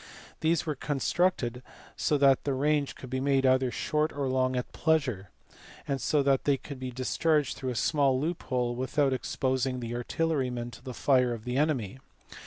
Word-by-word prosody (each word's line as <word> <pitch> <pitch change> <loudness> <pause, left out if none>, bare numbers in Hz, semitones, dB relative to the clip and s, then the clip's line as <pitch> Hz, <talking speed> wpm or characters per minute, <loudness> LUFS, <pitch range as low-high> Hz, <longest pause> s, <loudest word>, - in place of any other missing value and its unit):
These 165 +1 +1
were 155 - -1
constructed 135 -2 0 0.3
so 150 - +1
that 135 -2 +4
the 140 -2 -1
range 145 +1 +1
could 130 - -10
be 130 - -1
made 135 0 +2
either 130 0 +3
short 150 +5 0
or 140 -1 -2
long 130 0 +1
at 125 - -3
pleasure, 135 - 0 0.6
and 135 -1 -1
so 150 -2 +2
that 135 -1 +2
they 140 -1 +3
could 140 0 -9
be 130 0 -4
discharged 145 +4 0
through 130 - -4
a 125 - -3
small 135 -1 +2
loophole 130 -6 -1
without 135 +2 +1
exposing 130 0 -1
the 120 -1 -5
artillerymen 125 -2 -1
to 120 - -13
the 130 -2 -7
fire 125 -3 +3
of 110 - -11
the 125 0 -2
enemy. 135 -6 0
135 Hz, 180 wpm, -29 LUFS, 125-145 Hz, 0.6 s, that